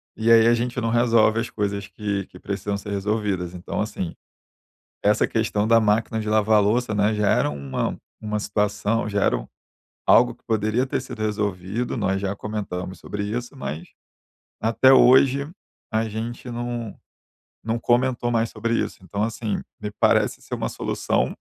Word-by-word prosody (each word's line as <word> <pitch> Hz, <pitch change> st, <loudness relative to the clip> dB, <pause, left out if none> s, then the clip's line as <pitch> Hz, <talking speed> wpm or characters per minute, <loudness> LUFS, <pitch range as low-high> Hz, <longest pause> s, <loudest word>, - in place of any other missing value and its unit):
e 115 Hz, +1 st, +2 dB
aí 115 Hz, 0 st, +7 dB
a 120 Hz, -, +6 dB
gente 120 Hz, +1 st, -1 dB
não 115 Hz, -1 st, -1 dB
resolve 115 Hz, -1 st, +3 dB
as 115 Hz, -, -2 dB
coisas 100 Hz, -1 st, -3 dB
que 100 Hz, 0 st, -3 dB
que 90 Hz, -, -14 dB
precisam 100 Hz, 0 st, -3 dB
ser 100 Hz, +1 st, -7 dB
resolvidas. 100 Hz, -3 st, -1 dB
Então, 90 Hz, +3 st, -4 dB
assim, 95 Hz, -5 st, -4 dB, 0.9 s
essa -, -, +3 dB
questão 105 Hz, +1 st, 0 dB
da 115 Hz, 0 st, +6 dB
máquina 110 Hz, +1 st, +1 dB
de 105 Hz, -, -3 dB
lavar 110 Hz, 0 st, +4 dB
louça, 110 Hz, +2 st, +1 dB
né, 105 Hz, +1 st, +2 dB
já 105 Hz, -1 st, +1 dB
era -, -, +3 dB
uma 70 Hz, -2 st, -3 dB, 0.2 s
uma 105 Hz, 0 st, -2 dB
situação 105 Hz, +2 st, 0 dB
já 100 Hz, -1 st, +1 dB
era -, -, +2 dB
o -, -, -8 dB, 0.6 s
algo -, -, +5 dB
que -, -, -36 dB
poderia 110 Hz, +3 st, 0 dB
ter 135 Hz, -, -1 dB
sido 125 Hz, -4 st, -8 dB
resolvido, 105 Hz, +1 st, -2 dB
nós 95 Hz, +1 st, 0 dB
já 100 Hz, 0 st, -2 dB
comentamos 95 Hz, -4 st, -5 dB
sobre 105 Hz, +4 st, -5 dB
isso, 120 Hz, +6 st, -4 dB
mas 85 Hz, -, -5 dB, 0.7 s
até 115 Hz, +4 st, +5 dB
hoje 135 Hz, +3 st, +5 dB, 0.4 s
a 110 Hz, +1 st, +1 dB
gente 115 Hz, +3 st, -5 dB
não 120 Hz, -2 st, -4 dB, 0.7 s
não 115 Hz, +1 st, -1 dB
comentou 120 Hz, 0 st, +1 dB
mais 115 Hz, 0 st, +1 dB
sobre 115 Hz, +1 st, -2 dB
isso. -, -, -2 dB
Então, 100 Hz, +3 st, -3 dB
assim, 110 Hz, -1 st, -2 dB, 0.2 s
me 105 Hz, 0 st, -4 dB
parece -, -, +2 dB
ser -, -, -5 dB
uma -, -, -2 dB
solução -, -, -1 dB
110 Hz, 170 wpm, -23 LUFS, 100-115 Hz, 0.9 s, aí